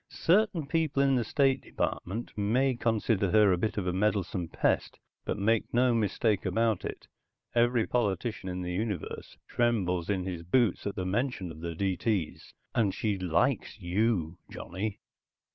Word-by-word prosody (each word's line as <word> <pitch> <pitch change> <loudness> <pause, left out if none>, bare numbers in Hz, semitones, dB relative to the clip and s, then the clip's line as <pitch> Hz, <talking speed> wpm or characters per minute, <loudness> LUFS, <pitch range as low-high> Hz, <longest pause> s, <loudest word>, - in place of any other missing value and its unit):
Certain 185 -3 +2
people 145 -2 +1
in 135 -1 +3
the 120 - +1
State 135 +3 +2
Department 110 +6 -3
may 125 +6 +2
consider 110 -4 +1
her 105 +1 +5
a 90 - +3
bit 110 +3 -1
of 100 - -1
a 90 - 0
meddlesome 95 -3 0
pest, - - 0 0.3
but - - -2
make 110 +2 +1
no 125 0 +3
mistake 110 -1 +1
about 110 -4 +1
it, - - -6 0.5
every 120 -1 +3
politician 105 -3 -1
in 90 0 -4
the 90 0 -3
universe 100 -2 -4
trembles 95 -8 0
in 95 -3 0
his 90 -2 -4
boots 105 +4 +1
at 100 - -3
the 95 - -2
very 95 - -2
mention 120 -5 -1
of 80 - -10
the 85 0 -5
D.T.'s. 95 -1 -1 0.2
And 105 -5 +1
she 105 -3 -1
likes 90 -3 0
you, 90 -2 0
Johnny." 100 +2 -5
105 Hz, 160 wpm, -29 LUFS, 90-120 Hz, 0.5 s, her